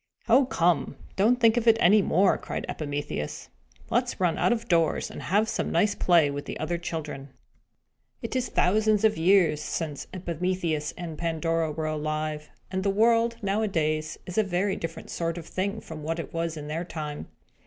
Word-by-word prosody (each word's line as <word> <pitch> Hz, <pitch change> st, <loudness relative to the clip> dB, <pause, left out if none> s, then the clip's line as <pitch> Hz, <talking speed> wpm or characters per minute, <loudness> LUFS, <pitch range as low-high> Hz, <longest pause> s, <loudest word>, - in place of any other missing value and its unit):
"Oh, 255 Hz, +4 st, +5 dB
come, 170 Hz, -, +1 dB, 0.2 s
don't 230 Hz, +6 st, +3 dB
think 230 Hz, -1 st, +5 dB
of 240 Hz, -1 st, 0 dB
it 225 Hz, 0 st, +7 dB
any 210 Hz, +1 st, +6 dB
more," 190 Hz, +1 st, +3 dB
cried -, -, -5 dB
Epimetheus. 145 Hz, -, -4 dB, 0.4 s
"Let -, -, +3 dB
us -, -, -6 dB
run 175 Hz, -3 st, +2 dB
out -, -, +3 dB
of 235 Hz, -1 st, -1 dB
doors, 165 Hz, -4 st, +1 dB
and -, -, -8 dB
have 210 Hz, +4 st, +2 dB
some -, -, -2 dB
nice 210 Hz, -2 st, +3 dB
play 165 Hz, -5 st, +3 dB
with 145 Hz, 0 st, -5 dB
the -, -, -6 dB
other 170 Hz, +2 st, -2 dB
children." 155 Hz, -5 st, -5 dB, 0.9 s
It -, -, -4 dB
is 255 Hz, -1 st, 0 dB
thousands 215 Hz, +2 st, +2 dB
of 215 Hz, -1 st, +4 dB
years 165 Hz, -4 st, +4 dB
since 155 Hz, -2 st, -4 dB
Epimetheus 170 Hz, -3 st, -2 dB
and 165 Hz, -3 st, -6 dB
Pandora 165 Hz, -1 st, 0 dB
were 155 Hz, +1 st, -3 dB
alive; 155 Hz, 0 st, -3 dB, 0.2 s
and 190 Hz, 0 st, -1 dB
the 200 Hz, -, +1 dB
world, 230 Hz, +3 st, +3 dB
nowadays, 160 Hz, -7 st, 0 dB
is 180 Hz, +4 st, -2 dB
a -, -, +4 dB
very 190 Hz, +1 st, 0 dB
different 165 Hz, 0 st, -6 dB
sort 165 Hz, 0 st, -2 dB
of 170 Hz, -, -7 dB
thing 200 Hz, +5 st, -2 dB
from 160 Hz, -1 st, -9 dB
what 165 Hz, +2 st, -2 dB
it 165 Hz, -, -6 dB
was 165 Hz, -1 st, -2 dB
in 150 Hz, -, -6 dB
their 160 Hz, +3 st, -3 dB
time. 150 Hz, -4 st, -6 dB
170 Hz, 185 wpm, -27 LUFS, 155-200 Hz, 0.9 s, it